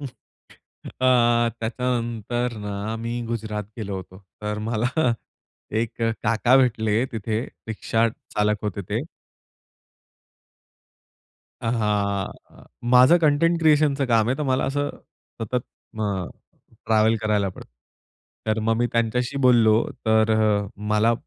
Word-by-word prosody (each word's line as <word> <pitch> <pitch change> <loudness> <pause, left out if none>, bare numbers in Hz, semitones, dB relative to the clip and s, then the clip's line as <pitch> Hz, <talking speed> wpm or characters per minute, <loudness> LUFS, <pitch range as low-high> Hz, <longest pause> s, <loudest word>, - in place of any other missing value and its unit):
अ, 140 - -5 1.5
त्याच्यानंतर 120 0 -2
ना 100 -1 -4 0.2
मी 115 +1 -4
गुजरात 110 -2 -3
गेलो 100 -3 -4
होतो. 95 0 -10 0.2
तर 105 0 -2
मला 115 +1 0 0.9
एक 115 0 -4
काका 115 +2 +2
भेटले 110 -2 +2
तिथे 110 0 -2 0.3
रिक्षा 115 +1 +1
चालक 105 -1 -2
होते 100 -1 -2
ते. - - 0 2.6
अहा. 105 -4 0 0.6
माझं 130 +7 +7
कंटेंट 165 +2 +3
क्रिएशनचं 150 -3 +3
काम 115 -2 +3
आहे 130 - +1
तर - - -1
मला 130 -2 +1
असं 145 +1 -1 0.5
सतत 115 +3 -4 0.4
अ, 100 -4 -1 0.6
ट्रॅवल 110 0 +3
करायला 105 -2 +1
पडतं. 90 - -11 0.8
तर 110 0 +1
मग 115 +1 +1
मी 120 +1 +2
त्यांच्याशी 120 +3 0
बोललो 115 -4 +5 0.2
तर 110 0 +4 0.3
अ, - - -8
मला 105 +2 +2
115 Hz, 110 wpm, -23 LUFS, 105-125 Hz, 2.6 s, माझं